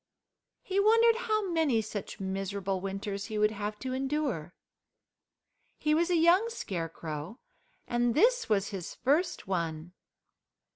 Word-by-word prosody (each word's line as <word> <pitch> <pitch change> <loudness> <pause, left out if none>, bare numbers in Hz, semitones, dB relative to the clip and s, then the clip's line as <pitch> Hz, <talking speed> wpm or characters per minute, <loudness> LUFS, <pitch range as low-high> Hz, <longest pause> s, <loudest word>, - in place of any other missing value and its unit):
He 390 +1 0
wondered 455 +2 +5
how 430 -3 0
many 315 -8 +2
such 215 -2 -5
miserable 195 0 -2
winters 195 +1 -4
he 215 -2 -4
would 210 0 +3
have 210 0 -4
to 255 0 -3
endure. 265 - -2 1.2
He 300 - +1
was 335 +3 +2
a 355 - +3
young 345 +7 +5
Scarecrow, 165 - -5 0.5
and 240 0 +1
this 485 - +3
was 200 -2 +2
his 190 -5 -6
first 300 +8 +1
one. 170 -2 -3
220 Hz, 130 wpm, -30 LUFS, -, 1.2 s, wondered